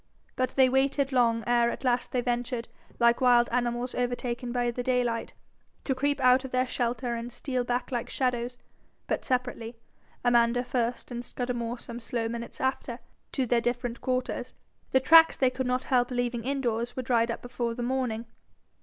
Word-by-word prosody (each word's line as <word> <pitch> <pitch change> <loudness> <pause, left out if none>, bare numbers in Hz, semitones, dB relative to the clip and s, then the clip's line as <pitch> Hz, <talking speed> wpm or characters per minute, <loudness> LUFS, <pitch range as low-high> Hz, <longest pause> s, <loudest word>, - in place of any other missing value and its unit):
But 255 0 -1
they 265 -1 +6
waited 270 +1 +1
long 230 -3 +2
ere 240 0 +3
at - - -5
last 245 -1 +1
they 250 - +1
ventured, 240 -1 -2 0.3
like 235 +1 +3
wild 240 -2 +5
animals 240 0 -1
overtaken 245 0 -2
by 240 -1 0
the 245 - -4
daylight, 245 -2 -1 0.5
to 270 - 0
creep 285 +2 0
out 255 +1 +5
of 265 - -6
their 255 0 +1
shelter 245 0 -1
and 235 +1 -5
steal 255 +1 -2
back 245 +2 -2
like 245 -1 -2
shadows 250 -1 -1 0.5
but - - -2
separately, 245 -2 -2 0.5
Amanda 240 0 +4
first, 245 0 -2
and 240 0 -4
Scudamore 240 -1 -3
some 235 0 -8
slow 230 -1 -2
minutes 235 +1 -6
after 260 -2 -1 0.4
to 265 - +1
their 235 0 +2
different 240 0 -2
quarters. 255 -1 -2 0.3
The 265 - +4
tracks 325 +5 +7
they 260 -1 +3
could 260 0 -3
not 250 +1 0
help 245 -1 +2
leaving 245 -2 -2
in 275 +1 -1
doors 235 -1 -1
were 255 - -3
dried 235 -1 +2
up 230 - -4
before 240 -1 -3
the 245 - -4
morning. 245 -3 -1
245 Hz, 180 wpm, -28 LUFS, 235-255 Hz, 0.5 s, tracks